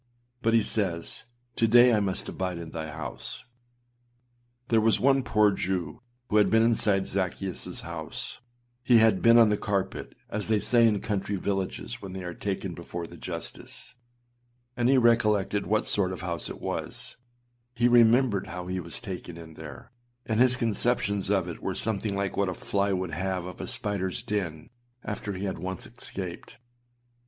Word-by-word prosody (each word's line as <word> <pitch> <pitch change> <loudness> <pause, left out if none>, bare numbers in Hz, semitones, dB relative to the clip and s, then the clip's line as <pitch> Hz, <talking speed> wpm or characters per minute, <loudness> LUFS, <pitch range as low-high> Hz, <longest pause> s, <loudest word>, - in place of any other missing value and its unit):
But 115 -1 +3
he 115 - +4
says, 95 -3 -2 0.3
âTo 115 - +2
day 120 +1 +7
I 110 - +4
must 95 -2 -1
abide 90 -2 -3
in 85 -1 -7
thy 80 -1 -5
house.â 75 -3 -6 1.3
There 115 -1 +4
was 110 0 +3
one 135 +1 +4
poor 105 -4 +3
Jew 95 +3 -3 0.3
who 105 - +2
had 105 - +5
been 115 0 +4
inside 105 -4 +3
Zaccheusâs 95 0 -3
house; - - -5 0.4
he 125 -2 +5
had 110 -4 +4
âbeen 115 0 +7
on 115 -2 +7
the 105 - +2
carpet,â 100 -2 -2
as 105 0 -3
they 110 -1 +3
say 115 +2 +5
in 105 -3 +1
country 100 -1 -2
villages 95 0 -3
when 95 -2 -7
they 95 -1 -5
are 90 -1 -5
taken 95 -1 -3
before 85 0 -6
the - - -11
justice, - - -7 0.8
and 120 0 +2
he 135 - +5
recollected 105 -4 +3
what 110 0 +2
sort 95 -3 +2
of 95 - -6
house 85 -3 -3
it - - -7
was; - - -4 0.6
he 120 +1 +3
remembered 120 -3 +4
how 90 +1 -6
he 90 +1 -2
was 85 -2 -4
taken 90 -6 -7
in 80 -1 -10
there, 80 - -10 0.3
and 110 -1 0
his 130 0 +5
conceptions 110 -4 0
of 95 -3 +2
it 85 - -7
were - - -2
something 105 -2 -1
like 100 -1 -2
what 100 -2 +1
a 90 - -4
fly 100 +3 0
would 95 -2 -1
have 90 +2 -2
of 90 -1 -7
a - - -4
spiderâs 95 -3 0
den 85 -6 -3 0.3
after 105 -1 -4
he 95 +1 -4
had 95 - -3
once 95 +1 -4
escaped. 95 -5 -7
100 Hz, 175 wpm, -27 LUFS, 90-110 Hz, 1.3 s, day